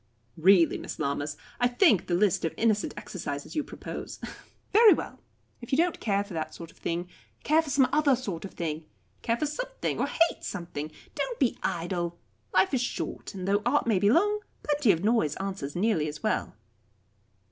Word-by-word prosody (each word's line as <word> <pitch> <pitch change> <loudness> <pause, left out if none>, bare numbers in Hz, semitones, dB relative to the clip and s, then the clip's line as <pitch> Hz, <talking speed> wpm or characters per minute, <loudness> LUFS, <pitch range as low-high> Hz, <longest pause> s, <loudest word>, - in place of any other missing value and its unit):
"Really, 175 0 +5
Miss - - -6
Lammas, 145 0 -2 0.2
I 245 - +4
think 245 - +4
the 175 - +1
list 195 0 +2
of 165 - -1
innocent 215 -2 +1
exercises 145 - -5
you 305 - +1
propose - - -7 0.3
" - - -34
"Very 435 0 +8
well - - -6 0.4
if 240 - -9
you 265 - +3
don't 345 +2 +2
care 200 -2 +1
for 200 -2 -11
that 155 -1 -4
sort 165 -1 -9
of - - -25
thing, 170 +1 -3 0.4
care 310 +2 +4
for 315 - -8
some 275 -2 +4
other 295 -3 +4
sort 200 -10 -5
of 195 - -8
thing. 160 -2 -3 0.4
Care 230 0 0
for 305 - 0
something, - - -3
or - - +1
hate 330 0 +1
something. 160 -5 -5 0.2
Don't - - -3
be 260 -5 +2
idle. 170 0 -2 0.3
Life 375 - +3
is 255 - +2
short, 245 - -4
and 185 -1 -5
though 200 +1 +2
art 265 +6 +2
may 220 -5 +2
be 200 - +4
long, 415 - +3 0.2
plenty 290 -6 +3
of 170 -1 -1
noise 210 -9 +2
answers 190 -8 -4
nearly 180 -5 +1
as 150 0 -7
well." - - -1
205 Hz, 190 wpm, -28 LUFS, 170-280 Hz, 0.4 s, Very